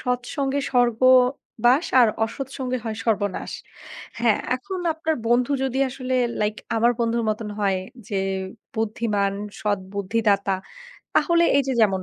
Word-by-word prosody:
সৎ 250 0 -1 0.2
সঙ্গে 280 0 0
স্বর্গবাস। 250 +2 +3 0.2
আর 235 - +6 0.2
অসৎ 235 +4 -5
সঙ্গে 255 -1 -2
হয় 220 -1 -3
সর্বনাশ। 205 -3 -1 0.7
হ্যাঁ, 230 -3 +3 0.2
এখন 370 +9 -6 0.2
আপনার 320 0 -1
বন্ধু 245 +3 +3
যদি 265 0 -1
আসলে 255 0 -3 0.3
লাইক 210 0 +1 0.2
আমার 235 +2 +4
বন্ধুর 230 0 +1
মতন 215 0 -4
হয় 195 -2 +1 0.3
যে 200 -3 -1 0.6
বুদ্ধিমান, 210 -2 0 0.3
সৎ 205 -1 0 0.2
বুদ্ধিদাতা, 200 -1 +1 0.6
তাহলে 340 -1 +4
এই 275 - +2
যে 265 - +1
যেমন 195 -3 +2
235 Hz, 135 wpm, -23 LUFS, 210-255 Hz, 0.7 s, আর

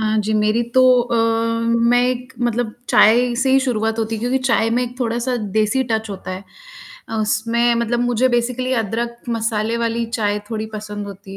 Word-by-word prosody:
हाँ 215 0 0
जी, 215 +1 -1
मेरी 215 +2 +2
तो 260 - +6 0.2
अ, 240 0 -2 0.5
मैं 235 +1 +2
एक 255 +1 -3
मतलब 240 -2 -1
चाय 240 +3 +4
से 265 - +1
ही 270 - +5
शुरुआत 225 -3 -1
होती 225 0 -1
है 215 - -5
क्योंकि 245 +3 0
चाय 230 -3 +1
में 240 +2 +1
एक 245 +1 -6
थोड़ा-सा 240 +1 -1 0.2
देसी 215 +5 +2
टच 220 0 -1
होता 190 -1 -7
है, 185 +1 -6 0.8
उसमें 230 +3 +1
मतलब 235 +1 0
मुझे 245 +1 +2
बेसिकली 250 +1 -1
अदरक, 235 +1 -2
मसाले 225 -1 -1
वाली 235 0 -1
चाय 210 -3 -1
थोड़ी 220 -1 -3
पसंद 210 -1 -6
होती 195 0 -10
230 Hz, 180 wpm, -19 LUFS, 215-245 Hz, 0.8 s, तो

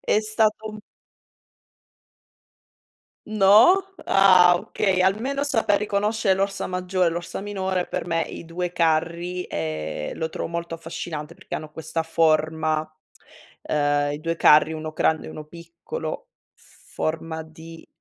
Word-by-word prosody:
È - - +2
stato 215 0 0
un 215 - -9 2.5
No? 215 - +5 0.2
Ah 185 -2 +6
okay, 195 -1 -1
almeno 240 +9 0
saper 225 -7 +2
riconoscere 210 0 +1
l'Orsa 195 +1 -2
Maggiore, 180 -1 0
l'Orsa 170 +2 -5
Minore 190 -3 -2
per - - -4
me 165 -1 0
i 170 - -8
2 175 +1 -4
Carri, 170 +2 0
ehm, 80 -2 -4
lo 160 -1 -3
trovo - - -4
molto 170 0 -4
affascinante, 165 -1 -6
perché - - -9
hanno 155 -1 -6
questa 160 +1 -4
forma, 155 -1 +1 0.7
ehm 145 -1 0
i 145 - -6
2 165 +1 -2
Carri 155 0 +5
1 155 0 -5
grande 160 0 0
e - - -7
1 155 - -8
piccolo, 170 - -7 0.3
forma 160 0 -5
di 160 +1 -13
170 Hz, 125 wpm, -23 LUFS, 160-195 Hz, 2.5 s, Ah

